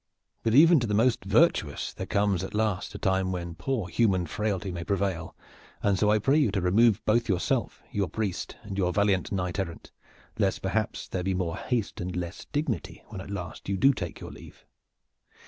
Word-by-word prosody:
But 115 0 +1
even 165 +2 +8
to 120 - -1
the 105 - 0
most 115 +3 +3
virtuous 100 - +2
there - - -6
comes 100 -3 +1
at 100 +2 -6
last 105 -2 -1
a - - -3
time 95 -1 +1
when 85 -2 -4
poor 115 +1 -2
human 95 -2 +2
frailty 100 +2 -2
may 85 -1 -4
prevail, 95 -3 -2 0.5
and 100 -2 +2
so 105 - +3
I 105 - +5
pray 135 +8 +3
you 140 -7 +3
to 100 - +1
remove 100 +4 +3
both 115 +2 +2
yourself, 90 -3 0
your 100 -4 -1
priest 105 -3 -3
and 100 -2 -5
your 90 -2 +2
valiant 100 -2 +1
knight 90 -1 -2
errant, 85 -4 -5 0.5
lest 100 -3 +1
perhaps 105 +3 -1
there 90 - -3
be 95 +1 -1
more 85 -3 -1
haste 120 -8 -2
and 90 0 -4
less 90 0 -5
dignity 145 - -3
when 95 - -6
at 95 - -10
last 95 -2 -6
you 100 - 0
do 135 +8 +5
take 90 -8 -5
your - - -8
leave. - - -14
100 Hz, 200 wpm, -27 LUFS, 90-110 Hz, 0.5 s, even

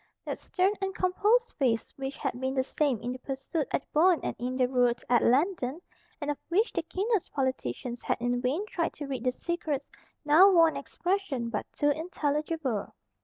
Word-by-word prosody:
That - - -4
stern 375 +2 +1
and 385 -1 -2
composed 420 +6 +2
face 235 -5 +1
which 270 0 -5
had 260 -3 -3
been 260 +1 -1
the 260 - +2
same 275 -3 0
in 245 - -2
the 255 - -6
pursuit 270 +3 -3
at - - 0
the - - -38
Boyne 340 +2 +5
and - - -2
in 250 +1 -2
the 255 -1 +3
rout 245 -1 +2
at 240 - +5
Landen, 280 +1 +2 0.4
and 295 -1 -1
of 290 - -5
which 410 +7 +2
the 340 - 0
keenest 390 +4 -1
politicians 250 - -2
had - - 0
in 245 +1 0
vain 285 +11 0
tried 340 -5 -2
to 295 - -6
read 265 -4 -4
the 255 - +2
secrets, 300 -1 -3 0.4
now 320 +7 +8
wore 335 -4 +6
an - - -7
expression 350 -11 -2
but 210 - -3
too 290 0 +2
intelligible. 300 - -2
290 Hz, 195 wpm, -29 LUFS, 255-345 Hz, 0.4 s, now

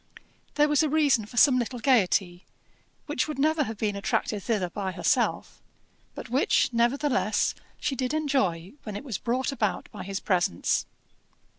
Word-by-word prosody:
There 295 0 +4
was 295 0 +3
a 310 - +1
reason 285 -8 +2
for 240 - -12
some 255 +1 +6
little 245 +1 -3
gaiety, 195 -7 +2 0.6
which 290 -3 -1
would 305 - -5
never 305 +1 +2
have 225 -2 -6
been 210 -1 -1
attracted 200 +1 -1
thither 195 -5 -1
by 190 -1 -4
herself, - - 0 0.5
but - - -7
which, 250 0 +2
nevertheless, 240 -1 +1 0.3
she 290 -2 -1
did 255 0 -2
enjoy 260 - -1
when 210 -3 -7
it 205 - -6
was 245 -9 -4
brought 255 +3 -1
about 215 -7 -2
by - - -8
his 195 +1 -4
presence. 175 - 0
240 Hz, 160 wpm, -26 LUFS, 200-280 Hz, 0.6 s, some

